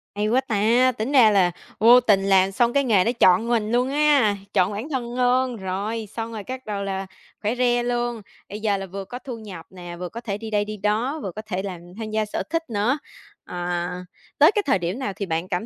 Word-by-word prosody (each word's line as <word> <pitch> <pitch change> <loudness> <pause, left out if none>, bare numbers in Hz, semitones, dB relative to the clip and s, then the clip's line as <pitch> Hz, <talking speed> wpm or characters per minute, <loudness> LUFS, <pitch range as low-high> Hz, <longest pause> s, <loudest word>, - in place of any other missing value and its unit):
Hay 210 +1 0
quá 250 +4 +3
ta, 235 +2 +3
tính 240 +3 -4
ra 240 -6 +6
là 185 -3 +3 0.3
vô 240 +3 +8
tình 205 -5 +3
làm 195 -1 +4
xong 240 +4 +1
cái 280 - +3
nghề 215 -8 +3
nó 235 - +1
chọn 225 -1 +4
mình 225 -3 0
luôn 245 +2 +2
ha, 285 -7 +3 0.2
chọn 185 -1 +3
bản 215 +8 -5
thân 245 -4 -3
luôn, 250 0 +2
rồi, 205 +3 -4
xong 225 0 -4
rồi 215 -3 -6
cắt 260 +2 -7
đầu 205 -2 -3
là 195 -1 -3 0.4
khỏe 215 +3 -1
re 245 -1 +2
luôn. 240 -1 -2 0.3
Bây 205 +2 -6
giờ 205 -2 +1
là 195 - -5
vừa 195 +1 -7
có 245 +6 -7
thu 255 -3 -7
nhập 195 -7 -9
nè, 175 -2 -9
vừa 180 -1 -5
có 235 - -8
thể 205 -4 -3
đi 220 +1 -7
đây 205 -1 +1
đi 215 0 -6
đó, 220 +9 -1
vừa 195 - -4
có 215 - -7
thể 190 -4 -4
làm 185 -3 -5 0.2
tham 220 -1 -5
gia 215 0 0
sở 210 - -3
thích 330 -2 -2
nữa. 225 +5 +1 0.5
Ờ, 175 -1 -3 0.5
tới 300 +5 +7
cái 415 - +2
thời 230 -9 +2
điểm 175 +7 -3
nào 205 -7 -3
thì 200 - -4
bạn 165 +1 -2
cảm 180 +3 -2
215 Hz, 240 wpm, -23 LUFS, 195-245 Hz, 0.5 s, vô